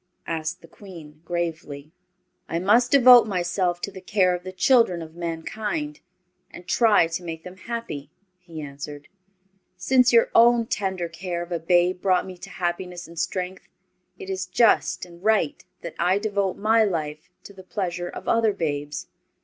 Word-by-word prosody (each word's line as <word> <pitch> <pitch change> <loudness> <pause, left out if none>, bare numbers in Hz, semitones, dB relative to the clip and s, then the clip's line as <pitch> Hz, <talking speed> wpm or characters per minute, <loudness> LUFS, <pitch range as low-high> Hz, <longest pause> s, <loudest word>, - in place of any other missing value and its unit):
asked 160 +1 -4
the - - -13
Queen, 160 -5 -13
gravely. 160 -4 -4 0.6
"I 165 - -1
must 215 +8 +3
devote 250 -4 +8
myself 180 -2 -1
to 200 - -4
the 190 - -10
care 185 -1 +2
of 175 - -7
the 185 - -6
children 185 -4 +3
of 160 0 -12
mankind, 210 - -4 0.5
and 175 - -12
try 215 -6 +4
to 165 +2 -5
make 165 -1 -6
them 180 +1 -10
happy," 190 -11 -6 0.3
he 170 -3 -9
answered. 145 +1 -9 0.7
"Since 255 +6 +3
your 230 -1 +4
own 235 0 +5
tender 190 -5 -2
care 175 +1 -5
of 175 - -12
a 170 - -1
babe 175 +2 +2
brought 185 -2 +3
to - - -11
me 180 -1 -10
happiness 180 -1 -4
and 165 0 -9
strength, 180 +2 -3 0.5
it 390 - -9
is 380 - -3
just 180 -8 +2
and 175 0 -16
right 215 -8 +1 0.2
that 170 - -7
I 180 +3 +3
devote 200 -2 -1
my 220 +2 +3
life 155 -4 -3
to 200 - -12
the 190 - -12
pleasure 175 -2 -4
of - - -9
other 225 -2 +3
babes. 145 -5 -3
180 Hz, 165 wpm, -24 LUFS, 165-205 Hz, 0.7 s, devote